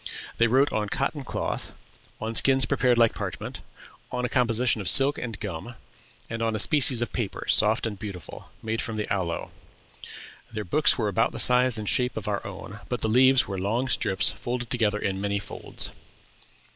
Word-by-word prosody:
They 115 - +4
wrote 135 +5 +3
on 105 -1 -1
cotton 140 +4 -2
cloth, - - -4 0.5
on 110 +1 -4
skins 135 +2 +3
prepared 125 +1 +2
like 115 -1 +4
parchment, - - -6 0.5
on 125 0 -2
a - - -2
composition 120 -2 +1
of 95 - 0
silk 135 +7 +5
and 115 -4 -6
gum, 100 +4 -6 0.5
and 115 0 -5
on 115 -1 0
a - - 0
species 125 0 +3
of - - -7
paper, 110 -6 -4
soft 110 +2 +4
and 105 -4 -4
beautiful, 100 -5 -8
made 110 0 -2
from 110 - -4
the 105 -1 -3
aloe. 90 -4 -3 1.0
Their 110 -1 -4
books 150 - +3
were 110 -4 0
about 115 +3 +1
the - - -6
size 125 -1 +4
and 105 -1 -5
shape 125 +2 0
of 105 - -5
our 100 -1 -2
own, 100 +2 -9
but 125 - -2
the 110 - 0
leaves 130 +3 +5
were 95 -2 -4
long 115 +7 -1
strips 100 -5 +3
folded 120 -1 -5
together 110 -4 +1
in 95 -2 -3
many 100 0 -1
folds. 100 - -3
115 Hz, 185 wpm, -26 LUFS, 105-125 Hz, 1.0 s, silk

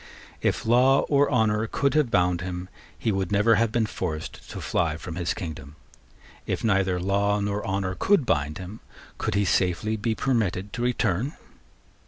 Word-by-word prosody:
If - - 0
law 125 +4 +5
or 145 0 +4
honour 110 -2 +2
could 140 +4 0
have 150 -5 +2
bound 90 -3 +2
him, 90 0 -5 0.3
he 110 - 0
would 95 -2 -2
never 105 +3 +4
have 115 -1 +1
been 115 -1 +1
forced 80 -7 -5
to - - -6
fly 80 -2 0
from 80 0 -7
his 85 -1 -1
kingdom. 80 -4 -7 0.7
If - - -2
neither 95 -4 +2
law 100 +2 +1
nor 100 0 -2
honour 95 -1 -1
could 200 -9 +3
bind 75 -7 0
him, 95 +4 -8 0.4
could - - -1
he 100 0 +2
safely 95 +4 +1
be 110 +2 -1
permitted 105 -7 -1
to 120 - -4
return? 120 - 0
100 Hz, 170 wpm, -25 LUFS, 90-115 Hz, 0.7 s, law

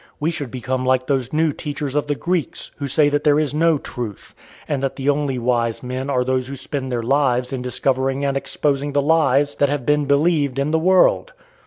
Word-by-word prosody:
We 155 +3 0
should 145 -5 -5
become 130 +1 -3
like 130 0 +1
those 130 -3 -1
new 155 0 +2
teachers 145 -2 -5
of 150 0 0
the 145 - 0
Greeks, 175 +1 -3
who 140 - -4
say 145 +2 +3
that 145 0 0
there 150 0 +4
is 150 -2 -1
no 165 +1 +3
truth, 120 -7 -7 0.3
and 145 -3 -1
that 135 -1 -2
the 135 +1 -1
only 145 -2 0
wise 120 -1 0
men 130 +2 -4
are 130 -2 +1
those 130 0 -1
who 140 - -6
spend 135 0 -4
their 120 -2 -2
lives 130 -1 +1
in 130 - -3
discovering 135 +2 -1
and 140 -1 0
exposing 140 +1 -1
the 145 - +2
lies 145 -2 +3
that 145 - +2
have 145 -3 -2
been 150 +1 +2
believed 140 -1 +2
in 140 +2 0
the 160 - +2
world. 185 - +3
140 Hz, 215 wpm, -20 LUFS, 130-150 Hz, 0.3 s, there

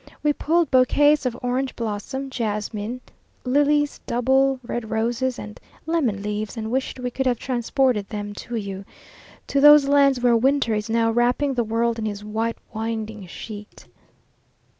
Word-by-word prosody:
We 295 -1 +3
pulled 330 +1 +1
bouquets 285 +2 +4
of 245 -1 -4
orange 255 +2 -1
blossom, 235 +5 -4
jasmines, 215 0 -3 0.4
lilies, 290 +2 +2
double 265 +2 +2
red 235 -2 -4
roses, 235 +3 -1
and 210 0 -9 0.3
lemon 270 -12 0
leaves, 210 +2 -4
and 220 0 -4
wished 260 0 -2
we 250 0 -3
could 265 +1 -1
have 245 -2 +2
transported 245 -3 0
them 205 -2 -5 0.2
to 240 - -3
you, 200 -3 -4 0.6
to 280 - 0
those 295 -1 +8
lands 280 -2 +4
where 245 -1 +3
winter 265 0 +2
is 210 +1 -2
now 225 0 +2
wrapping 245 +4 +1
the 245 -2 0
world 230 +1 0
in 220 - -2
his 205 -1 -5
white 225 +2 -2 0.2
winding 220 -2 -4
sheet. 210 +3 -10
240 Hz, 155 wpm, -23 LUFS, 220-270 Hz, 0.6 s, those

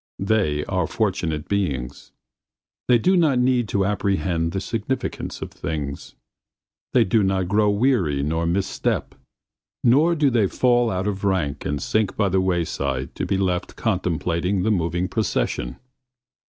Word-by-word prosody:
They 95 -9 +1
are 90 -4 -1
fortunate 85 -8 -1
beings. 70 -10 -2 0.8
They 125 - +6
do 185 - +2
not 155 -7 +3
need 125 -2 +2
to 100 0 0
apprehend 95 -4 0
the 95 - -2
significance 115 +6 -3
of - - -8
things. 75 -3 -5 0.8
They - - +6
do 110 +4 +2
not 95 -2 +1
grow 105 +1 +3
weary 100 - +1
nor 80 +3 -1
miss 95 +3 +1
step, - - -2 0.7
nor 150 +8 +4
do 145 -4 +2
they 115 -5 +3
fall 120 +2 +2
out 95 -1 -2
of 100 -1 -3
rank 85 -8 -1
and 70 0 -1
sink 110 +3 0
by 100 -2 +2
the 95 +1 +2
wayside 80 -8 -1
to - - -3
be 100 - +1
left 90 -2 -1
contemplating 90 +3 -1
the 110 - +2
moving 90 -1 0
procession. 90 - -2
95 Hz, 150 wpm, -23 LUFS, 85-110 Hz, 0.8 s, They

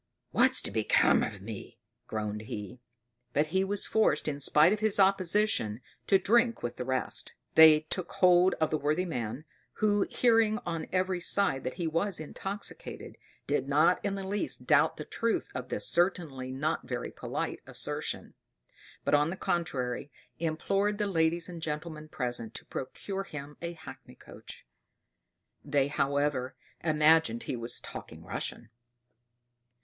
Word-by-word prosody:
What's - - +4
to - - -2
become - - +3
of 100 -3 -4
me!" 110 -1 -8 0.3
groaned 105 -1 -3
he; 105 +3 -6 0.5
but 150 - +3
he 190 0 +3
was 200 +1 0
forced, 220 -6 +2
in 145 -2 -2
spite 150 +6 +5
of 215 - -2
his 215 -1 +2
opposition, 190 - +3 0.3
to 195 - +6
drink 230 +5 +2
with 120 - -4
the 125 - -4
rest. 130 0 -2 0.2
They 160 -1 +8
took 170 +3 -5
hold 180 0 +5
of 155 - 0
the 155 - 0
worthy 155 +5 0
man; 125 -2 -4 0.3
who, 205 -2 +2
hearing 225 -3 +3
on 165 -2 -3
every 185 -1 0
side 180 -6 +1
that 130 - -3
he 175 - -3
was 165 +3 0
intoxicated, 195 +6 -7 0.3
did - - 0
not - - +3
in 200 -1 -1
the 195 - -5
least 205 +10 -3
doubt - - +4
the - - -6
truth 230 0 -1
of - - -5
this - - -1
certainly 155 -8 0
not 145 +5 -2
very 125 -1 -4
polite - - -4
assertion; - - -3 0.7
but - - +1
on 145 +1 +4
the 185 - -4
contrary, 140 -9 -2 0.3
implored 195 +6 0
the 210 - 0
ladies 165 -3 +1
and 175 -2 -8
gentlemen 155 0 -5
present 120 -5 -4
to - - -7
procure 195 +8 -5
him 150 -4 -8
a 170 0 -4
hackney 165 - -12
coach: - - -13 1.0
they, 140 -1 +1
however, 140 -2 0 0.3
imagined 155 -6 +3
he - - -3
was 115 0 -1
talking - - -9
Russian. 115 - -5
160 Hz, 150 wpm, -30 LUFS, 135-195 Hz, 1.0 s, They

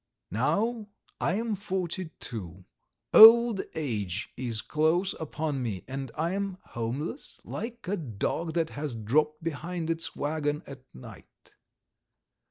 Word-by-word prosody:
Now 205 - 0 0.3
I 180 - +1
am 225 +1 -1
forty 185 -3 -3
two, 95 - -6 0.5
old 230 -2 +10
age 105 - -3
is 120 -3 -3
close 165 +5 +1
upon 155 -3 -3
me, 105 -7 -3
and 135 -1 -5
I 165 +3 0
am 195 -1 -2
homeless, 125 - -4
like 235 -2 -6
a 205 +2 0
dog 155 - -3
that 165 -2 0
has 145 -4 -4
dropped 150 +8 +1
behind 165 +1 -3
its 165 0 -3
waggon 150 0 -1
at 135 -1 -10
night. 65 - -14
155 Hz, 125 wpm, -28 LUFS, 130-185 Hz, 0.5 s, old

